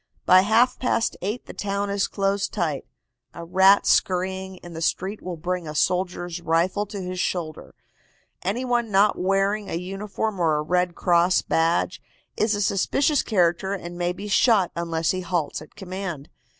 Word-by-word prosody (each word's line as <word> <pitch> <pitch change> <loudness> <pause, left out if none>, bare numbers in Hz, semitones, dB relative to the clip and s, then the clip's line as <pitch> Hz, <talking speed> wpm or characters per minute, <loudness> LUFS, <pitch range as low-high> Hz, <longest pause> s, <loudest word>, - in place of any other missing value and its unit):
By 185 0 +7
half 225 +5 +3
past 230 -2 0
eight 210 +6 -3
the - - -9
town 200 0 -2
is 200 0 0
closed 200 0 -1
tight. 155 -5 -2 0.5
A 170 - -7
rat 190 +3 +5
scurrying 190 +1 +1
in 175 -1 -10
the 160 - -6
street 190 +5 -1
will 180 -2 -6
bring 180 +1 -3
a 150 - -6
soldier's 175 0 -1
rifle 170 +5 +1
to 200 0 -6
his 185 -1 -5
shoulder. 165 -4 -3 0.7
Any 215 +8 -2
one 240 -2 0
not 205 +1 +4
wearing 195 +2 0
a - - -3
uniform 195 +3 -4
or 160 -3 +2
a 150 - -1
Red 180 +2 0
Cross 175 +1 +3
badge 170 +3 0 0.3
is 215 0 +1
a 205 - 0
suspicious 275 - +2
character 190 -1 +1
and 175 -2 -8
may 175 0 -1
be 200 +3 -7
shot 205 -2 +3
unless 165 -1 -1
he 185 - -3
halts 170 -5 -2
at 155 - -14
command. 185 -6 -6
185 Hz, 170 wpm, -24 LUFS, 175-200 Hz, 0.7 s, By